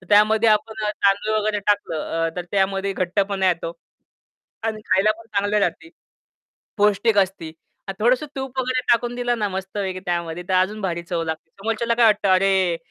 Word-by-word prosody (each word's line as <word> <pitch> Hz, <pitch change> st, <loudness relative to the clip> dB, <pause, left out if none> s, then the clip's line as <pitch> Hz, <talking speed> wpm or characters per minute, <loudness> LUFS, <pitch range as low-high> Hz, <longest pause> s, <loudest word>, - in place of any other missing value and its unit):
तर 185 Hz, -, -19 dB
त्यामध्ये 215 Hz, +2 st, +5 dB
आपण 215 Hz, 0 st, +1 dB
अ, 210 Hz, -, +1 dB
तांदूळ 205 Hz, +1 st, +1 dB
वगैरे 210 Hz, 0 st, 0 dB
टाकलं 165 Hz, -5 st, 0 dB
अ, -, -, 0 dB
तर 180 Hz, -, -3 dB
त्यामध्ये 195 Hz, 0 st, 0 dB
घट्टपणा 195 Hz, +1 st, 0 dB
येतो. 165 Hz, -1 st, -1 dB, 0.9 s
आणि 220 Hz, -1 st, -2 dB
खायला 195 Hz, +3 st, +3 dB
पण 230 Hz, -, -14 dB
चांगलं 205 Hz, 0 st, 0 dB
राहती. 165 Hz, -4 st, -2 dB, 0.9 s
पौष्टिक 210 Hz, +1 st, +3 dB
असती. 185 Hz, -5 st, 0 dB, 0.4 s
आणि 195 Hz, -, -4 dB
थोडंसं 250 Hz, +5 st, +3 dB
तूप 265 Hz, -1 st, -4 dB
वगैरे 255 Hz, 0 st, 0 dB
टाकून 240 Hz, +1 st, +1 dB
दिलं 245 Hz, -1 st, -1 dB
ना, 210 Hz, -, +1 dB
मस्त 190 Hz, +1 st, -6 dB
आहे 190 Hz, -2 st, -2 dB
त्यामध्ये 175 Hz, -2 st, -3 dB
तर 185 Hz, -, +1 dB
अजून 195 Hz, +4 st, +1 dB
भारी 170 Hz, -3 st, -2 dB
चव 170 Hz, -1 st, -2 dB
लागते. 160 Hz, 0 st, -5 dB
समोरच्याला 225 Hz, +2 st, -1 dB
काय 235 Hz, -, +5 dB
वाटतं 210 Hz, -2 st, +3 dB
अरे, 190 Hz, -2 st, +2 dB
200 Hz, 175 wpm, -22 LUFS, 185-215 Hz, 0.9 s, त्यामध्ये